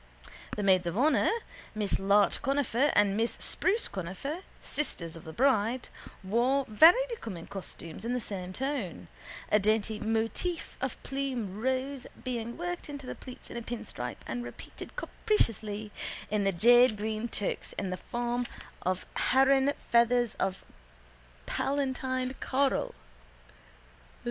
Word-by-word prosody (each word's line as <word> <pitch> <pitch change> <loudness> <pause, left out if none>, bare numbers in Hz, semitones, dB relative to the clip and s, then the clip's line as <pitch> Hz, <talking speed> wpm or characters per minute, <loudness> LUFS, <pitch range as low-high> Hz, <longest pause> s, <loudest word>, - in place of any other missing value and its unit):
The 210 - -2
maids 185 -2 +4
of 170 +3 -2
honour, 295 +6 +4 0.5
Miss 210 -2 0
Larch 200 +1 +4
Conifer 275 0 +2
and 205 -1 +4
Miss 225 +2 +1
Spruce 425 +5 +1
Conifer, 190 - -4 0.2
sisters 170 - -3
of 165 - -11
the 160 - -6
bride, 245 - +2 0.3
wore 245 +8 +2
very 325 - +7
becoming 220 - -6
costumes 185 -2 -7
in 240 +2 -1
the - - +1
same 185 -5 -5
tone, 205 - -3 0.4
a 210 - +6
dainty 215 +1 +1
motif 225 - -1
of 265 -2 -2
plume 250 -7 -3
rose 260 +1 -1 0.2
being 235 -2 -3
worked 350 -1 -4
into 285 -2 -6
the - - -4
pleats 255 -2 -11
in - - -5
a - - -3
pinstripe 220 - -6
and 120 +1 -3
repeated 120 - -9
capriciously 220 - -1 0.4
in 210 -2 +2
the 195 - +4
jadegreen 220 +2 +4
toques 205 - -2
in 195 -2 -3
the 185 - -2
form 240 +2 -2 0.3
of 185 0 -1
heron 270 +1 +4 0.2
feathers 235 -1 +4
of 190 0 -1 0.8
paletinted 260 -2 -1
coral. 270 +1 +1
235 Hz, 130 wpm, -30 LUFS, 200-265 Hz, 0.8 s, very